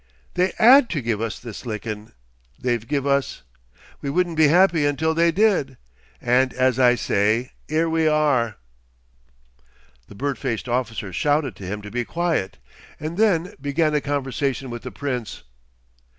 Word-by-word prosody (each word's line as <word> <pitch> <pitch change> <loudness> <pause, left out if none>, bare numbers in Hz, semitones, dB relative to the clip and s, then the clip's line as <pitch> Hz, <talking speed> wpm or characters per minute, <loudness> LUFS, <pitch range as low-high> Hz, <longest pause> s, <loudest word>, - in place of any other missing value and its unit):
They 180 +1 +1
'ad 250 +3 +7
to 155 - -2
give 115 -2 -1
us 115 -3 -3
this 115 -4 -9
lickin' 110 -2 -6 0.5
they've 120 -3 -1
give 140 0 -1
us. 140 - 0 0.6
We 140 - -3
wouldn't 175 +2 0
be 155 -1 +5
happy 175 0 +4
until 150 +3 +1
they 170 +1 +3
did, 180 - +1 0.4
and 125 +1 +2
as 130 0 +2
I 125 -1 +5
say, 110 +2 0 0.2
'ere 160 +2 +1
we 160 -1 +1
are!" 145 -8 +2 1.5
The - - -13
bird 140 +4 -3
faced 125 -3 -3
officer 115 -6 -2
shouted 145 - 0
to 95 - -8
him 105 +2 -5
to 105 - -9
be 120 0 -1
quiet, 165 - -2 0.4
and 155 +2 -5
then 195 -3 +2
began 150 +2 +1
a 150 - +1
conversation 135 -2 -2
with 120 -1 -6
the - - -7
Prince. 125 -5 -5
140 Hz, 155 wpm, -22 LUFS, 120-160 Hz, 1.5 s, ad